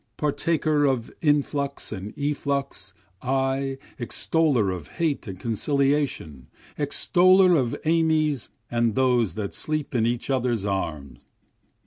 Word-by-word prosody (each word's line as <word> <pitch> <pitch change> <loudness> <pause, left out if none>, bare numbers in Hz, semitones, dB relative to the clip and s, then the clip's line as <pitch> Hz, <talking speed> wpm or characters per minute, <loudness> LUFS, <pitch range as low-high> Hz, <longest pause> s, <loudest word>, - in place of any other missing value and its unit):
Partaker 150 0 +1
of 130 -4 0
influx 145 -2 0
and 100 0 -5
efflux 140 -8 -2 0.3
I, 135 +1 0 0.2
extoller 125 - +1
of 80 -5 -9
hate 160 -8 -1
and 95 -2 -7
conciliation, 135 - 0 0.3
Extoller 180 +5 +4
of 125 -6 +1
amies 155 -5 +2 0.2
and 120 -2 +1
those 125 -5 +2
that 105 -2 -4
sleep 155 -2 -3
in 115 -2 +2
each 120 +3 -2
others' 120 -5 0
arms. 75 -10 -3
135 Hz, 110 wpm, -25 LUFS, 110-150 Hz, 0.3 s, Extoller